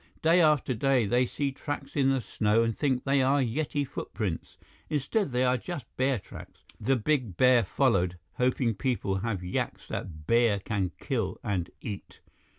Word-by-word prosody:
Day 170 +3 +5
after 150 -5 +3
day, 130 0 +2
they 120 +4 +2
see 140 +2 -2
tracks 145 +1 -6
in 135 -2 +3
the 135 -1 +1
snow 110 +1 +1
and 115 -1 0
think 130 -4 0
they 135 0 +2
are 135 +2 +3
Yeti 140 +3 -1
footprints. 100 -8 -4 0.3
Instead, 150 - 0
they 125 +1 +1
are 125 0 +3
just 165 -4 -6
bear 130 0 +2
tracks. 95 - -12 0.2
The 135 - +2
big 125 - 0
bear 125 -2 +5
followed, 90 -5 +1 0.2
hoping 125 -1 +2
people 110 -4 -1
have 100 -2 -2
yaks 90 - -3
that 80 -3 -6
bear 115 +1 +3
can 100 -1 -2
kill 115 -10 -2
and 95 -5 -1
eat. 100 -3 -7
125 Hz, 165 wpm, -28 LUFS, 105-135 Hz, 0.3 s, Day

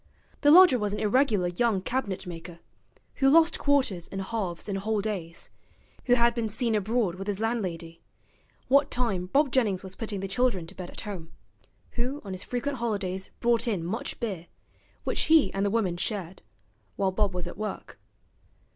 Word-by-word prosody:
The 290 - +5
lodger 335 -5 +8
was 205 -1 -1
an 210 - -2
irregular 210 -5 +2
young 210 +3 +1
cabinet 205 -2 -3
maker, 170 0 -8 0.6
who 270 -1 +4
lost 325 +3 +5
quarters 260 -12 +1
and 195 - -6
halves 195 -3 -3
and 195 -1 -2
whole 215 +2 0
days; 190 -6 -4 0.5
who 245 - +5
had 235 -1 +4
been 230 -2 -2
seen 225 +2 -1
abroad 215 -2 +1
with 195 +2 -7
his 205 -1 -2
landlady, 180 -8 -3 0.7
what 280 +2 +4
time 205 -8 -1
Bob 280 +7 +2
Jennings 210 -8 +1
was 190 0 -9
putting 215 -3 -4
the 195 - -3
children 195 -4 +1
to 175 - -11
bed 180 -2 -7
at - - -8
home; 175 -6 -7 0.6
who 255 +4 -2
on 195 - -6
his 185 - -5
frequent 265 +3 -3
holidays 195 -5 -2
brought 235 0 +2
in 190 -8 -1
much 220 +8 -4
beer, 190 -8 -4 0.6
which - - 0
he 315 -11 +5
and 195 - -1
the 200 - +2
woman 195 -5 0
shared, 190 -2 -4 0.5
while 195 -1 +1
Bob 195 -1 0
was 180 -1 -2
at 175 - -7
work. 215 +1 -6
210 Hz, 180 wpm, -27 LUFS, 185-240 Hz, 0.7 s, lodger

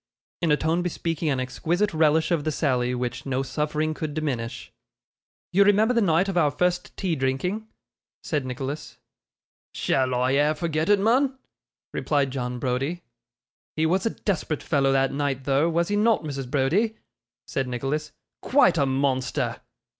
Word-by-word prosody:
in 165 -3 +2
a 150 - +4
tone 160 +3 0
bespeaking 165 -2 -2
an 135 -3 0
exquisite 175 +10 -1
relish 160 +1 +3
of 165 -4 +1
the 155 - 0
sally, 125 -5 0
which 125 +1 -3
no 135 -1 -1
suffering 150 +3 -1
could 155 -2 -5
diminish. 130 -7 -3 0.8
'You 200 +2 +6
remember 210 +4 +4
the 235 - +3
night 175 -1 +3
of 195 - -2
our 160 -4 +4
first 180 +4 -1
tea 180 -4 0
drinking?' 155 +11 -1 0.6
said 150 -4 -1
Nicholas. 135 +4 -5 0.8
'Shall 130 -1 +1
I 125 +1 +1
e'er 145 +3 +3
forget 160 0 -1
it, 205 -1 +5
mun?' 260 +6 +2 0.6
replied 140 -3 0
John 125 -2 -3
Browdie. 135 +7 -2 0.7
'He 155 - +1
was 185 +6 +2
a - - -4
desperate 175 -6 -1
fellow 135 -1 +2
that 135 0 +2
night 140 -2 -1
though, 140 +4 +2
was 170 +2 0
he 205 - +1
not, 215 -1 +3
Mrs. 135 -4 -5
Browdie?' 180 - +1 0.5
said 135 -2 -2
Nicholas. 135 +5 -3 0.3
'Quite 260 -9 +4
a 140 - +3
monster! 130 -1 -1
150 Hz, 160 wpm, -25 LUFS, 135-175 Hz, 0.8 s, You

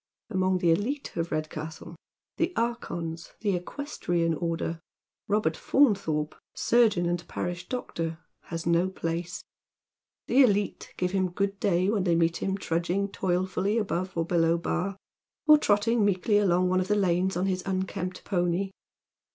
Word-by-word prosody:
Among 185 -1 +2
the 175 -2 +3
elite 245 - -1
of 170 0 -2
Redcastle 155 +1 -5 0.2
— - - -65
the 335 +2 +1
archons 170 -8 -3
— - - -40
the 205 -4 +1
equestrian 175 - -2
order 165 0 -2 0.2
— - - -65
Robert 205 -6 +1
Faunthorpe, 195 - +2 0.2
surgeon 220 -7 +3
and 175 0 -2
parish 175 0 -4
doctor, 165 -10 -3 0.3
has 165 -1 -5
no 170 +2 +3
place. 170 -1 -4 0.8
The 270 - +4
elite 205 -5 +2
give 180 0 0
him 190 -1 +1
good 195 +2 -1
day 185 -2 +2
when 210 -4 +1
tbey 170 -2 +3
meet 165 0 +2
him 195 0 -1
trudg 170 -3 -2
ing 200 +3 +1
toilfully 190 +3 0
above 185 -4 -2
or 165 - +1
below 170 -1 +2
Bar, 185 +3 -2 0.5
or 305 -1 +8
trotting 220 -1 +2
meekly 205 +1 +3
along 180 -2 +3
one 185 0 +2
of 185 - -1
the 210 - +2
lanes 185 -2 +1
on 180 - +1
his 185 -1 0
unkempt 185 -1 -3
pony. 180 0 0
185 Hz, 160 wpm, -28 LUFS, 170-200 Hz, 0.8 s, or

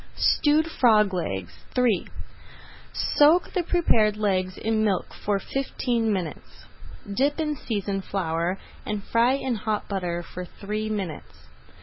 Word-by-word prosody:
STEWED 300 +1 +3
FROG 215 -10 +3
LEGS 95 - -3 0.2
III 240 -7 +2 0.8
Soak 310 +5 +3
the 365 - +1
prepared 230 - +2
legs 185 -3 0
in 220 0 0
milk 195 -4 0
for 205 -1 -1
fifteen 235 0 -1
minutes, 180 -6 -5 0.5
dip 285 +6 +1
in 300 -1 0
seasoned 200 -6 -3
flour, 175 -1 -1 0.3
and 210 -1 -3
fry 235 +4 +3
in 265 -2 -1
hot 215 -1 -2
butter 175 -3 -2
for 180 +1 -7
three 210 +4 -4
minutes. 195 -7 -5
210 Hz, 125 wpm, -25 LUFS, 185-250 Hz, 0.8 s, STEWED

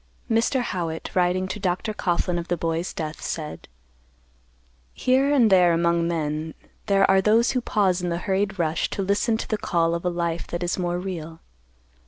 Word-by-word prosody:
Mr. 230 +3 +2
Howitt, 170 -7 -4
writing 185 +1 +1
to 200 - -5
Dr. 195 +3 -1
Coughlan 175 -2 0
of 170 - -6
the 175 - -1
boy's 165 +2 -2
death, 155 -1 -5
said: 155 -2 -5 1.3
"Here 265 +2 +2
and 245 -7 +4
there 180 -2 +6
among 170 0 +2
men, 155 -1 -2 0.3
there 195 -1 +4
are 190 0 +4
those 225 +4 +3
who 255 - 0
pause 190 -6 +1
in 180 - -2
the 170 - -1
hurried 195 +2 -1
rush 160 -2 0
to 195 - -3
listen 205 +4 +1
to - - -5
the 215 - -2
call 165 -1 +1
of 170 - -3
a 180 - +1
life 170 -1 -2
that 175 +1 -4
is 175 +1 -1
more 175 -1 -1
real. 165 -3 -6
180 Hz, 185 wpm, -24 LUFS, 170-200 Hz, 1.3 s, there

